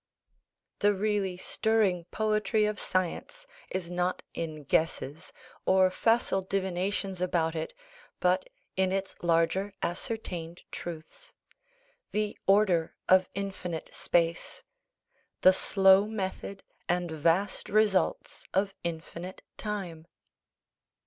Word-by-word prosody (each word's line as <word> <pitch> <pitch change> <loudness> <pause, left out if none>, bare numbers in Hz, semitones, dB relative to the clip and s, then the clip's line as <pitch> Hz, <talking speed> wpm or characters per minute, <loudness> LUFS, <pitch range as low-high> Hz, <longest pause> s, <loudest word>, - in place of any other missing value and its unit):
The 205 0 +4
really 200 -2 0
stirring 200 -3 +1
poetry 215 +2 +1
of 210 0 -1
science 185 - -2 0.2
is 180 -2 -3
not 180 +1 -1
in 155 -2 -5
guesses, 160 +2 0 0.3
or 185 0 +4
facile 225 -1 +2
divinations 190 0 -1
about 165 -3 +1
it, 160 -1 -4 0.4
but 180 +1 +2 0.3
in 190 0 +2
its 195 0 -2
larger 175 +4 +1
ascertained 175 -2 -3
truths 175 - -8 0.8
the 210 0 -1
order 195 -5 +3
of 185 0 +5
infinite 190 -4 -4
space, 170 0 0 0.8
the 185 - +8
slow 195 +1 +5
method 195 -2 -4 0.3
and 175 -1 0
vast 170 +5 +1
results 205 -4 +2
of 195 +1 +2
infinite 170 +2 -6
time. 180 -7 -5
185 Hz, 100 wpm, -29 LUFS, 170-200 Hz, 0.8 s, the